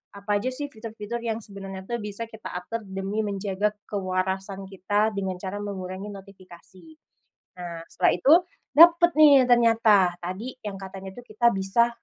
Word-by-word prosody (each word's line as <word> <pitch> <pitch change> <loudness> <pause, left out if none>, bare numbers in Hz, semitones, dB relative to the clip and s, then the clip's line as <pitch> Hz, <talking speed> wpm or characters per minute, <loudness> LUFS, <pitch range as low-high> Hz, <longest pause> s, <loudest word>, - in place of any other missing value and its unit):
apa 200 +1 -6
aja 235 - -4
sih 285 +3 -3
fitur-fitur 220 +1 -6
yang 225 -1 -2
sebenarnya 195 -2 -8
tuh 235 0 -3
bisa 210 +2 -5
kita 220 -1 -10
atur 230 +6 -5
demi 195 +2 -4
menjaga 200 0 -1 0.2
kewarasan 190 0 -2
kita, 205 +3 0
dengan 190 -2 -2
cara 195 +2 -5
mengurangi 190 0 -6
notifikasi. 190 - -14 0.7
Nah, 170 -2 -7
setelah - - +2
itu 265 - +4 0.4
dapet 345 +3 +7
nih 285 -4 +7
ternyata, 225 -6 +4
tadi 190 +9 -5
yang 205 -2 -6
katanya 190 0 -8
tuh 245 - -12
kita 235 +2 +2
bisa, 195 +5 +2
200 Hz, 150 wpm, -25 LUFS, 190-230 Hz, 0.7 s, dapet